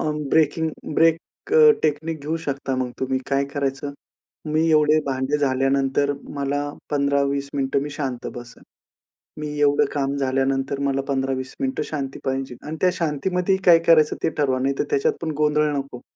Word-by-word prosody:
अ, 155 Hz, -, 0 dB, 0.2 s
breaking 160 Hz, +1 st, +2 dB, 0.2 s
break 165 Hz, +1 st, +5 dB, 0.7 s
technique 155 Hz, +1 st, -1 dB
घेऊ 155 Hz, +3 st, -2 dB
शकता. 140 Hz, -2 st, -2 dB
मग 130 Hz, -1 st, -2 dB
तुम्ही 130 Hz, 0 st, 0 dB
काय 140 Hz, 0 st, +2 dB
करायचं? 140 Hz, 0 st, -2 dB, 0.6 s
मी 160 Hz, +2 st, +2 dB
एवढे 155 Hz, 0 st, +4 dB
भांडे 135 Hz, +2 st, 0 dB
झाल्यानंतर, 135 Hz, +1 st, +1 dB, 0.2 s
मला 140 Hz, 0 st, -1 dB, 0.3 s
15-20 140 Hz, -1 st, +1 dB
मिनिटं 135 Hz, 0 st, 0 dB
मी 145 Hz, -, -5 dB
शांत 135 Hz, -4 st, -4 dB
बसणं. 120 Hz, -1 st, -11 dB, 0.8 s
मी 150 Hz, -, -3 dB
एवढं 145 Hz, 0 st, +4 dB
काम 140 Hz, -1 st, -1 dB
झाल्यानंतर, 135 Hz, +1 st, 0 dB
मला 140 Hz, -1 st, 0 dB
15-20 135 Hz, -1 st, -2 dB
मिनिटं 130 Hz, 0 st, -1 dB
शांती 135 Hz, -3 st, -5 dB
पाहिजे 135 Hz, -1 st, -2 dB
आणि 155 Hz, +1 st, -5 dB
त्या 185 Hz, -, +5 dB
शांतीमध्ये 180 Hz, +4 st, 0 dB
ही 190 Hz, -, -6 dB
काय 170 Hz, -2 st, +8 dB
करायचं, 155 Hz, -2 st, +5 dB
ते -, -, +3 dB
ठरवा. 130 Hz, -3 st, +1 dB
नाही 135 Hz, +1 st, +1 dB
तर -, -, +3 dB
त्याच्यात 140 Hz, -, +2 dB
पण 160 Hz, -1 st, -2 dB
गोंधळ 150 Hz, 0 st, +2 dB
नको. 135 Hz, -3 st, -6 dB
140 Hz, 160 wpm, -22 LUFS, 135-150 Hz, 0.8 s, काय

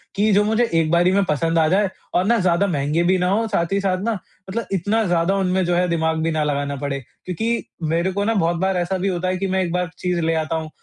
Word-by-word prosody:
कि 210 Hz, +2 st, +2 dB
जो 205 Hz, +1 st, +4 dB
मुझे 220 Hz, +3 st, +2 dB, 0.2 s
एक 155 Hz, -, +1 dB
बारी 175 Hz, +2 st, +4 dB
में 200 Hz, +1 st, +3 dB
पसंद 165 Hz, +1 st, +1 dB
आ 155 Hz, -, +4 dB
जाए 195 Hz, +3 st, +2 dB, 0.3 s
और 180 Hz, -, +3 dB
ना 235 Hz, +3 st, +3 dB
ज़्यादा 185 Hz, +1 st, +2 dB
महँगे 150 Hz, +1 st, 0 dB
भी 185 Hz, +2 st, +3 dB
ना 180 Hz, -, 0 dB
हों, 225 Hz, +3 st, +1 dB
साथ 170 Hz, -5 st, -1 dB
ही 200 Hz, -, +2 dB
साथ 185 Hz, -2 st, 0 dB
न -, -, +2 dB, 0.4 s
मतलब 230 Hz, +4 st, -3 dB
इतना 205 Hz, +5 st, +1 dB
ज़्यादा 175 Hz, +2 st, +1 dB
उनमें 190 Hz, -1 st, +1 dB
जो 175 Hz, 0 st, +1 dB
है 180 Hz, +1 st, +2 dB
दिमाग़ 160 Hz, -1 st, 0 dB
भी 165 Hz, +1 st, 0 dB
ना 155 Hz, -1 st, 0 dB
लगाना 140 Hz, -1 st, -1 dB
पड़े। 140 Hz, -1 st, -2 dB, 0.3 s
क्योंकि 225 Hz, +6 st, -1 dB, 0.3 s
मेरे 175 Hz, +3 st, +1 dB
को 200 Hz, +2 st, -1 dB
न 225 Hz, +1 st, +1 dB
बहुत 170 Hz, 0 st, +1 dB
बार 190 Hz, 0 st, +1 dB
ऐसा 175 Hz, +2 st, -1 dB
भी 185 Hz, +2 st, -1 dB
होता 185 Hz, -1 st, -1 dB
है 185 Hz, 0 st, 0 dB
कि 195 Hz, -, -2 dB
मैं 190 Hz, 0 st, +1 dB
एक 175 Hz, -, -3 dB
बार 180 Hz, -1 st, -1 dB
चीज़ 180 Hz, -1 st, -1 dB
ले 165 Hz, 0 st, +1 dB
आता 165 Hz, -, -3 dB
हूँ 160 Hz, -1 st, -4 dB
180 Hz, 270 wpm, -21 LUFS, 165-195 Hz, 0.4 s, जो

